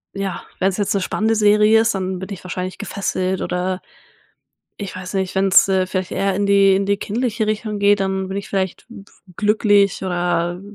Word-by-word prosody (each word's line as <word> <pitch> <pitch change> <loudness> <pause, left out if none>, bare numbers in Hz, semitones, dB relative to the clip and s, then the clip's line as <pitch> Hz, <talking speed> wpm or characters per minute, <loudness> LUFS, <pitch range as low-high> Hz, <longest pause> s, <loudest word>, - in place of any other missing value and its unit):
ja, 195 -2 -4 0.2
wenn's 190 0 +1
jetzt 205 -1 0
'ne 200 - +1
spannende 220 +4 0
Serie 210 +1 +5
ist, 225 - +1
dann 185 -1 -3
bin 190 - -6
ich 190 - -10
wahrscheinlich 185 +1 -5
gefesselt 185 -1 -2
oder 180 +1 -2 1.0
ich 200 -3 -6
weiß 185 +1 -7
nicht, 190 -1 -1
wenn's, 195 0 +5
äh, 190 -1 +1
vielleicht 185 -1 -3
eher 195 -1 0
in 200 +1 0
die 200 -1 +5
in 195 +1 0
die 200 0 +1
kindliche 220 +1 -2
Richtung 215 -1 -2
geht, 200 0 +4
dann 190 0 -1
bin 190 - -5
ich 200 - -6
vielleicht 190 -2 -2 0.5
glücklich 205 -2 +2
oder 175 -1 -1
195 Hz, 185 wpm, -20 LUFS, 185-205 Hz, 1.0 s, Serie